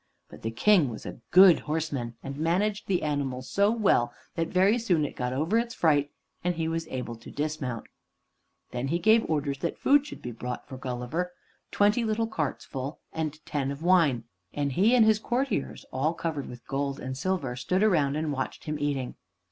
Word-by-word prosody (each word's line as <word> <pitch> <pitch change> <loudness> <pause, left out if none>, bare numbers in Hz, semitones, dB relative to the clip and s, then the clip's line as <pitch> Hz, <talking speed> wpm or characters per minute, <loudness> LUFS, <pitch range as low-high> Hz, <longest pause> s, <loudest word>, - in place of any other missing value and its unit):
But - - -13
the 110 - -2
King 155 - +4
was 110 - -8
a - - -7
good 185 -1 +8
horseman, 150 -7 -3
and 135 0 -5
managed 185 +7 0
the 185 -3 +1
animal 140 -4 -1
so 200 +9 +2
well 205 - +2 0.2
that 165 -1 -1
very 195 +7 +3
soon 175 -10 +2
it - - -6
got 125 0 -2
over 160 - +1
its 235 0 -3
fright, 145 -3 +3 0.3
and 180 0 0
he 165 -1 -1
was 165 0 -2
able 125 -4 -4
to 115 - -12
dismount. 145 -6 -3 0.9
Then 125 +2 -2
he 165 +5 +1
gave 220 +6 +4
orders 145 -3 -1
that 170 - -2
food 290 +1 +4
should - - -10
be 125 - -4
brought 125 +2 -6
for 135 - -8
Gulliver, 130 +8 -3 0.4
twenty 210 +4 +3
little 220 0 0
carts 160 -11 -3
full, 135 +3 -5
and 155 -1 -4
ten 140 -2 -1
of 140 +3 -5
wine; 165 -10 +4 0.3
and 145 -1 0
he 205 - +4
and 230 -3 +6
his 220 -1 +4
courtiers, 245 - -2
all 150 +6 0
covered 160 -5 -3
with 120 -1 -10
gold 140 0 -2
and 130 0 -5
silver, 140 -4 -1
stood 185 - 0
around 150 -9 +3
and 155 -1 -1
watched 130 -1 -4
him 150 -1 -3
eating. 140 -3 -2
155 Hz, 195 wpm, -28 LUFS, 135-185 Hz, 0.9 s, good